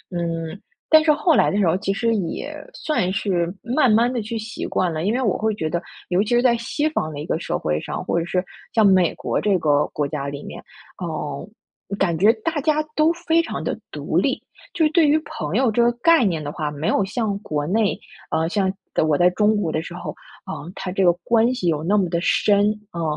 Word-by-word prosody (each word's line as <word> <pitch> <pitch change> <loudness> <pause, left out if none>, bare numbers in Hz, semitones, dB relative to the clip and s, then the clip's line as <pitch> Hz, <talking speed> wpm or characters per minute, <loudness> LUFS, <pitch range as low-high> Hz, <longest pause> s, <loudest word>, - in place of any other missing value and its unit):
嗯， 165 +1 -3 0.3
但 315 -1 +6
是 315 - +5
后 320 +2 +2
来 - - +4
的 200 - -1
时 200 - +3
候， 165 - +3
其 195 0 -2
实 230 +3 +1
也 210 - -3 0.2
算 240 - -1
是 180 -4 0
慢 250 +1 +2
慢 235 +3 +3
地 240 - -1
去 225 +2 -4
习 220 +1 -6
惯 175 -3 0
了， 155 - -3
因 205 - +1
为 250 - 0
我 210 -7 +1
会 220 -1 0
觉 160 - -2
得， 170 +2 -2 0.3
尤 180 +2 +2
其 215 - -2
是 240 - +3
在 240 -2 +4
西 290 +6 -1
方 160 - -2
的 145 - -7
一 150 - -5
个 160 - -1
社 - - -2
会 75 0 -1
上， - - -5
或 170 - +1
者 165 - -2
是 180 +1 -1 0.3
像 220 -2 +4
美 185 -3 +4
国 - - -2
这 200 -3 +2
个 150 -3 +2
国 145 -1 -2
家 140 -1 -4
里 140 0 -6
面， - - -9 0.4
呃， 155 0 -5 0.5
感 175 -5 +1
觉 205 +7 +6
大 325 -2 0
家 305 +1 +1
都 310 +2 +4
非 335 -1 +1
常 335 - -5
地 - - -2
独 - - -4
立。 - - +1 0.3
就 325 - +1
是 305 - +2
对 320 -2 +4
于 295 - +4
朋 155 +5 -5
友 250 -2 +3
这 235 - +2
个 240 - +4
概 330 -4 +5
念 165 -6 -1
的 145 - -4
话， 150 -1 -3
没 150 +2 -4
有 205 - +2
像 210 -1 -2
国 150 -7 -3
内， 210 +3 +1 0.3
呃， 160 0 +1
像 190 -1 +1 0.4
我 150 - +2
在 175 0 +5
中 210 +3 +2
国 180 -6 -1
的 155 - -1
时 - - -9
候 - - -5 0.3
啊， - - -5
呃， 170 +4 -9
他 180 - -5
这 190 +1 +1
个 175 - +7
关 235 +1 +3
系 190 -8 -2
有 155 -2 0
那 200 +5 +2
么 185 -4 +1
的 170 - 0
深。 205 +2 +3 0.3
嗯， 170 - -4
195 Hz, 260 characters per minute, -22 LUFS, 165-235 Hz, 0.5 s, 个